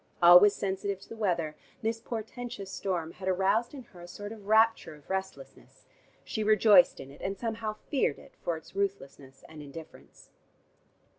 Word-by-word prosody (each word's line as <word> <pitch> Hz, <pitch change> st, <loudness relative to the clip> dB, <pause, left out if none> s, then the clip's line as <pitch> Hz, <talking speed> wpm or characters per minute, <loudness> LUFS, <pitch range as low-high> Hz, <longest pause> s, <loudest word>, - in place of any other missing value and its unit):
Always 180 Hz, +4 st, +8 dB
sensitive 195 Hz, 0 st, -3 dB
to -, -, -15 dB
the -, -, -8 dB
weather, 170 Hz, -8 st, -1 dB, 0.3 s
this 225 Hz, +1 st, -1 dB
portentous 225 Hz, -3 st, -6 dB
storm 180 Hz, -3 st, -3 dB
had 185 Hz, +2 st, -9 dB
aroused 195 Hz, +7 st, +1 dB
in 265 Hz, -, -9 dB
her 180 Hz, -6 st, -16 dB
a 175 Hz, -, -10 dB
sort 205 Hz, +3 st, -8 dB
of 210 Hz, -3 st, -11 dB
rapture 220 Hz, -6 st, +3 dB
of 150 Hz, +4 st, -13 dB
restlessness: 190 Hz, -, -6 dB, 0.4 s
she 220 Hz, -, -3 dB
rejoiced 215 Hz, +4 st, +5 dB
in 135 Hz, 0 st, -9 dB
it, 140 Hz, -, -15 dB
and 195 Hz, +1 st, -3 dB
somehow 225 Hz, 0 st, -3 dB
feared 265 Hz, -, 0 dB
it -, -, -16 dB
for 170 Hz, -2 st, -2 dB
its 160 Hz, -, -16 dB
ruthlessness 140 Hz, -9 st, -4 dB
and 155 Hz, -1 st, -11 dB
indifference. 150 Hz, +2 st, -13 dB
195 Hz, 165 wpm, -29 LUFS, 175-220 Hz, 0.4 s, Always